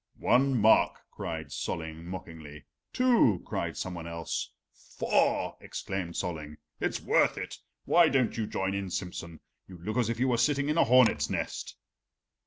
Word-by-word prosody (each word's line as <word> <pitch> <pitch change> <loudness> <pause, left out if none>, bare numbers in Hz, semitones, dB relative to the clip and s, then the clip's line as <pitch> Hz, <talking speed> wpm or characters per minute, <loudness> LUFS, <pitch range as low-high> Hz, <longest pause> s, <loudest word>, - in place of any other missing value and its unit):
"One 130 +1 +3
mark," 110 +1 +4
cried 80 -3 -5
Solling 80 +1 -4
mockingly. 80 -5 -9 0.3
"Two," 235 - +3
cried - - -3
somebody 85 -3 -5
else. 85 -1 -4 0.5
"Four," - - +1
exclaimed 95 -4 -5
Solling. 75 -4 -4 0.2
"It's - - -1
worth - - +2
it. - - -6 0.3
Why 170 -1 +5
don't 130 -3 +1
you 110 -2 -2
join 95 -1 -2
in, 100 -1 -3
Simsen? 85 -2 -5 0.3
You 90 - -11
look 105 +7 -4
as 120 -3 +2
if 115 0 -2
you 130 - +2
were 125 -2 +2
sitting 140 +2 +2
in 155 - +1
a - - +6
hornet's 115 - +4
nest." - - -4
95 Hz, 155 wpm, -29 LUFS, 85-125 Hz, 0.5 s, a